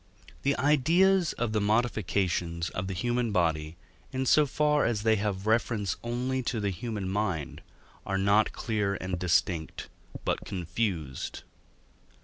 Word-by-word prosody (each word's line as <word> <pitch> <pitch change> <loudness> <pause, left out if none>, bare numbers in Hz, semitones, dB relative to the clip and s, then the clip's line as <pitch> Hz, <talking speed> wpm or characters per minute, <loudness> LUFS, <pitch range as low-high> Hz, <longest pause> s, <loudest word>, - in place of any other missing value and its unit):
The 140 0 +1
ideas 165 +6 +3
of 120 -3 -2
the 105 - +1
modifications 95 -6 0
of 90 +1 -3
the 95 - -4
human 120 +3 0
body, 80 -3 0 0.3
in 130 0 -1
so 150 +3 +5
far 150 +2 +2
as 110 -3 0
they 110 0 +4
have 100 -1 -2
reference 110 -3 +1
only 125 +2 -1
to 120 -2 -2
the 100 -1 0
human 105 +1 -4
mind, 95 -6 -2 0.4
are 95 - -1
not 100 +2 +3
clear 105 -3 -1
and 90 -1 -4
distinct, 85 -2 0 0.4
but - - 0
confused. 90 - -3
105 Hz, 135 wpm, -28 LUFS, 90-120 Hz, 0.4 s, so